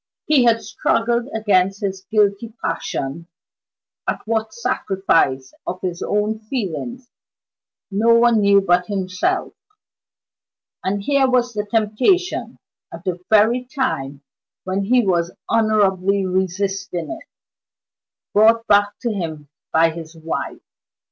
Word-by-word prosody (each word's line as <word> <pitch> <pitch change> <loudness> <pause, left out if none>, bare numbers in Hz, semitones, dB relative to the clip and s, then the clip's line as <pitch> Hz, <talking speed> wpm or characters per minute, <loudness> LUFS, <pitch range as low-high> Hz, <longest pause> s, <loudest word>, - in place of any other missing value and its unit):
He 285 -5 +4
had 230 -1 +3
struggled 235 +2 0
against 195 -3 +1
his 195 -2 -3
guilty 215 +1 +1
passion 145 +5 -3 0.8
at - - -3
what 220 0 -1
sacrifice 190 - 0
of 185 - -3
his 175 -2 -4
own 210 +1 0
feelings 235 - -4 0.8
no 225 +4 +4
one 230 -2 +4
knew 200 0 +5
but 180 -1 +2
himself 185 -2 -1 1.3
and 200 +1 -1
here 275 +2 +3
was 245 -1 +1
the 210 -1 -3
temptation, 230 - +1 0.3
at 165 +1 -9
the 180 -2 -2
very 220 +4 +4
time 145 - -3 0.4
when 190 +1 -2
he 245 +1 +3
was 175 -2 0
honorably 200 -3 +2
resisting 190 - -2
it, 330 0 -8 1.1
brought 225 +2 +5
back 205 0 +4
to 235 - -1
him 160 -7 -5 0.2
by 165 +1 +4
his 165 0 -9
wife! 160 0 -5
205 Hz, 115 wpm, -20 LUFS, 185-230 Hz, 1.3 s, knew